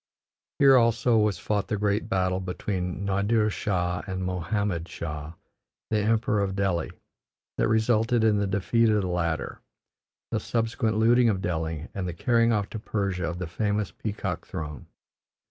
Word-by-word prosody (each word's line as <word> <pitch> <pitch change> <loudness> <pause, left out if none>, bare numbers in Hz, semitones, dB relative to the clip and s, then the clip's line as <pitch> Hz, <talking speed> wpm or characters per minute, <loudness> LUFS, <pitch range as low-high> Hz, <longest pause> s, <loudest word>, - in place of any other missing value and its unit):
Here 135 -2 +7
also 115 -1 +3
was 105 -2 +2
fought 105 -1 -1
the 105 - -1
great 105 +2 0
battle 95 -2 +1
between 90 0 -3
Nadir 105 +3 +2
Shah 90 -4 -1
and 95 -1 -3
Mohammed 90 -1 -2
Shah, 75 -1 -6 0.6
the 110 - +2
Emperor 110 0 +1
of 95 -1 -1
Delhi, 95 -4 0 0.7
that - - +3
resulted 110 +1 +2
in 110 -2 +4
the 100 0 +1
defeat 105 +4 +2
of 105 -2 +2
the - - -1
latter, 85 -2 -2 0.7
the - - 0
subsequent 115 -1 -1
looting 120 +2 +5
of 100 -4 0
Delhi, 80 -3 -3
and 95 -2 -3
the 90 - -3
carrying 115 +5 +2
off 105 -3 +1
to 110 - -4
Persia 100 -4 -2
of 85 - -5
the 90 - -3
famous 105 +2 -1
peacock 105 +4 -4
throne. 75 -1 -6
100 Hz, 160 wpm, -26 LUFS, 90-110 Hz, 0.7 s, Here